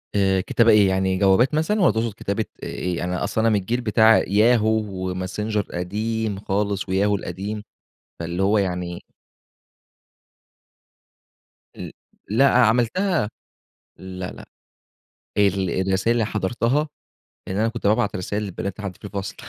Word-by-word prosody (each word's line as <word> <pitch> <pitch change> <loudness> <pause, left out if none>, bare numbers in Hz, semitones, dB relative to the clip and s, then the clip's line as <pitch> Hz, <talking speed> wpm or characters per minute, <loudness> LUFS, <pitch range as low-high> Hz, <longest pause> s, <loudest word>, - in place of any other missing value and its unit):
آآ 95 -2 +2
كتابة 115 +4 +3
إيه 105 -2 +6
يعني 95 0 +1
جوابات 100 +8 +3
مثلًا 180 +7 +1
والَّا 180 - +5
تقصد 115 -1 -2
كتابة 105 +2 -2 0.2
إيه؟ 90 -1 -3
أنا 90 0 -2
أصل 110 - -1
أنا 115 - +3
من 105 - +2
الجيل 115 +6 -2
بتاع 110 0 +5
Yahoo 110 +3 +3
وماسنجر 105 0 -2
قديم 105 +4 -3
خالص 100 -1 -1
وYahoo - - -18
القديم 100 +1 -1 0.6
فاللي 85 +3 -2
هو 105 +2 +3
يعني 90 -3 -3 2.7
ال - - -7 0.4
لا 130 +7 +4
عملتها 125 - +2 0.7
لا 95 -1 -6
لا - - -12 0.9
ال 100 -2 +2
الرسايل 95 +5 +1
اللي 115 - +1
حضرتها 115 +8 0 0.6
إن 95 - -3
أنا 110 +2 +2
كنت 115 -3 -2
بابعت 110 0 +1
رسايل 100 +3 -3
للبنات 100 -1 -5
اللي 105 - -6
عندي 90 -2 -6
في - - -12
الفصل 100 -1 -5
105 Hz, 135 wpm, -22 LUFS, 95-115 Hz, 2.7 s, إيه